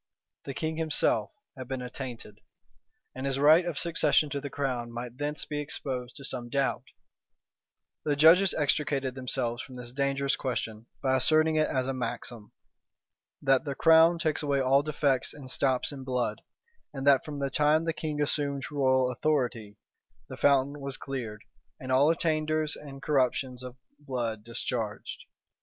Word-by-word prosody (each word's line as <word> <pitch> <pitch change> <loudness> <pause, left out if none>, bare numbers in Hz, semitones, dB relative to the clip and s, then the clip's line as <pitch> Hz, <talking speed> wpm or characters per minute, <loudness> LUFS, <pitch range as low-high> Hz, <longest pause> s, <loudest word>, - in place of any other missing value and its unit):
The 135 - -5
king 160 0 -2
himself 160 -2 +1 0.3
had 130 -2 -8
been 130 -1 -4
attainted; 120 -4 -7 0.7
and 130 +1 -4
his 135 -1 0
right 155 +5 +6
of 170 -4 -3
succession 155 -3 +2
to 140 - -2
the 145 - -5
crown 125 -4 -3
might 120 +2 -7
thence 150 +1 -2
be 150 -1 -4
exposed 130 -3 -4
to 140 -3 -8
some 120 -3 -4
doubt 140 +2 0 1.2
The 145 -1 +1
judges 170 +6 +6
extricated 140 -3 0
themselves 125 -2 -2
from 130 - -10
this 120 -1 -8
dangerous 140 0 0
question 115 -3 -4 0.2
by 130 -1 +3
asserting 155 +4 +3
it 155 0 +3
as 130 -1 0
a 135 - -2
maxim, 120 -3 -5 0.9
"That 135 -2 +3
the 140 -3 -4
crown 165 +2 +6
takes 160 -2 0
away 140 -2 +1
all 135 +1 +4
defects 145 -3 0
and 135 -3 -7
stops 130 -1 +1
in 135 -2 -8
blood; 125 -5 -2 0.5
and 135 -1 -5
that 140 -2 +5
from 150 -2 -6
the 140 -1 -2
time 150 +3 +3
the 165 - 0
king 155 -1 -4
assumed 140 -2 0
royal 130 -3 +2
authority, 120 -7 -1 0.5
the 130 - -6
fountain 140 +1 +2
was 140 -1 -4
cleared, 115 -6 -6 0.4
and 130 0 -6
all 135 +4 +5
attainders 155 -2 0
and 140 -1 -11
corruptions 130 -3 0
of 125 -1 -8 0.2
blood 120 -6 -3
discharged." 115 -1 -4
135 Hz, 160 wpm, -28 LUFS, 125-150 Hz, 1.2 s, right